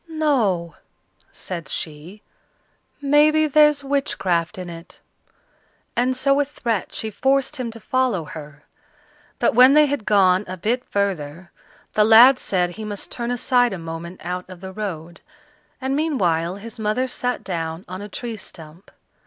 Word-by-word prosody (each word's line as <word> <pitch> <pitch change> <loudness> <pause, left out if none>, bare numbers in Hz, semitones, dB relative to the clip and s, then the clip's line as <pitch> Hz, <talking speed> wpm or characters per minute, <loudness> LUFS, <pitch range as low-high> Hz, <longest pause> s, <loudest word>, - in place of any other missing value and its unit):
"No," 235 - 0 0.5
said 170 -4 -6
she, 160 +7 -6 0.8
"maybe 300 +2 +4
there's 300 -1 +4
witchcraft 195 -10 -1
in 180 -1 -6
it;" 170 0 -11 1.0
and 255 +1 +1
so 275 +1 +3
with 285 0 +1
threats 230 -8 -3
she 220 - -4
forced 270 +6 +1
him 250 -3 -3
to 230 0 -9
follow 240 -5 0
her. 150 -1 -10 0.7
But 240 - +2
when 255 +3 +7
they 300 0 +6
had 285 -6 -3
gone 190 -2 +4
a 185 +1 -6
bit 235 +7 -1
further, 180 -4 -3 0.4
the 215 - +4
lad 235 +4 +8
said 180 -2 0
he 220 +5 -8
must 205 -2 -6
turn 235 -1 -4
aside 245 -1 +2
a - - -4
moment 165 +2 -8
out 180 +2 -5
of 185 -1 -10
the 190 +1 -8
road; 175 -5 -6 0.6
and 265 0 -1
meanwhile 185 - 0
his 225 +3 -10
mother 220 +4 0
sat 250 0 -3
down 165 -2 -4
on 185 +2 -7
a 205 - -8
tree 230 +2 -6
stump. 165 -1 -12
210 Hz, 155 wpm, -22 LUFS, 175-255 Hz, 1.0 s, lad